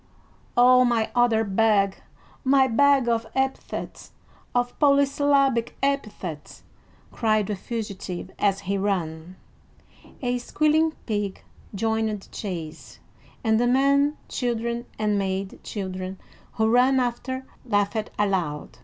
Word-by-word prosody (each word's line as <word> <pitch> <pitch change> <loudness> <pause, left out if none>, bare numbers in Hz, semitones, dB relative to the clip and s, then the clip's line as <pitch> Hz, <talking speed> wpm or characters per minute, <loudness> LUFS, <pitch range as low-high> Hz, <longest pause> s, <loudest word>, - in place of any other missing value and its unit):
"Oh, 250 +1 +7
my 235 -3 +1
other 240 -2 +3
bag, 200 -1 +2 0.5
my 270 0 +5
bag 270 +1 +4
of 230 -1 0
epithets, 265 0 -3 0.4
of 245 0 +1
polysyllabic 280 -3 +3
epithets!" 215 - -3 0.5
cried 215 -2 +1
the 210 - -2
fugitive 200 -4 -5
as 195 -1 +1
he 200 0 -2
ran. 175 -3 -2 0.9
A 245 0 0
squealing 310 +5 +2
pig 205 -3 -3 0.3
joined 220 +1 0
the - - -17
chase, 170 -6 -6 0.5
and 220 -1 +3
the 245 - +2
men 280 +3 +3
children 235 -1 -2
and 210 -1 +1
maid 190 0 -3
children 185 -2 -5 0.4
who 220 0 +1
ran 250 +3 +4
after 260 +2 -2 0.2
laughed 210 -1 0
aloud. 170 - -1
225 Hz, 110 wpm, -25 LUFS, 195-255 Hz, 0.9 s, Oh